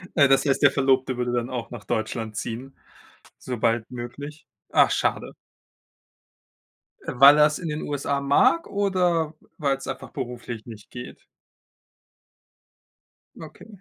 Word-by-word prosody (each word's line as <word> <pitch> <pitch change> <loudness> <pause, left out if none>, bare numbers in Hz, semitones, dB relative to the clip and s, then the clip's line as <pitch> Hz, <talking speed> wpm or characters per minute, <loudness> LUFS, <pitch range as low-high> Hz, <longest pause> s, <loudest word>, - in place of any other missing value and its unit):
Äh, 140 -4 +6
das 135 +1 +3
heißt, 135 +1 +1
der 140 -1 +6
Verlobte 135 -2 +1
würde 125 0 -1
dann 120 0 -1
auch 120 -2 -5
nach 115 -4 -8
Deutschland 110 0 -3
ziehen, 125 +6 -6 0.6
sobald 115 -2 -1
möglich? 140 +5 -8 0.3
Ach, - - +5
schade. - - -1 1.7
Weil 140 +4 +7
er 150 - +7
es 150 0 0
in 165 -3 -4
den 150 +1 -4
USA 140 -1 -2
mag 255 - +3
oder 180 -6 0 0.2
weil's 140 -3 -1
einfach - - -6
beruflich 120 -2 -6
nicht 110 -3 -12
geht? 125 0 -10 2.2
Okay, 155 +6 -12
135 Hz, 125 wpm, -24 LUFS, 120-150 Hz, 2.2 s, Weil